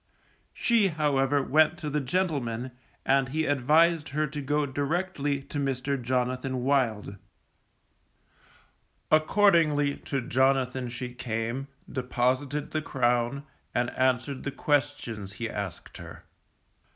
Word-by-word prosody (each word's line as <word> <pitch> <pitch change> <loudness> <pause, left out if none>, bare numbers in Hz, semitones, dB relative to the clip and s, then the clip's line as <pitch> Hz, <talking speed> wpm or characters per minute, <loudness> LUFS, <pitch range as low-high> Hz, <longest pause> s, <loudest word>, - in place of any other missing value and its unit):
She 230 -4 +3
however, 145 -4 +1
went 155 +5 +3
to 155 - -6
the 150 +1 0
gentleman, 130 -6 -1 0.3
and 135 -1 +3
he 155 +3 -1
advised 150 +4 +3
her 155 +2 0
to 150 0 -5
go 145 +2 0
directly 145 0 -1
to 145 +1 -5
Mr. 135 0 -1
Jonathan 125 +1 -1
Wild. 115 -7 0 1.9
Accordingly 155 -4 +4
to 140 - -3
Jonathan 130 -1 +1
she 125 +1 -6
came, 120 +2 -3 0.2
deposited 130 +3 -1
the 155 - -1
crown, 125 0 0 0.3
and 120 0 +1
answered 130 +1 0
the - - -3
questions 140 -8 -1
she 115 +2 -3
asked 100 -6 -6
him. - - -10
135 Hz, 115 wpm, -27 LUFS, 125-150 Hz, 1.9 s, Accordingly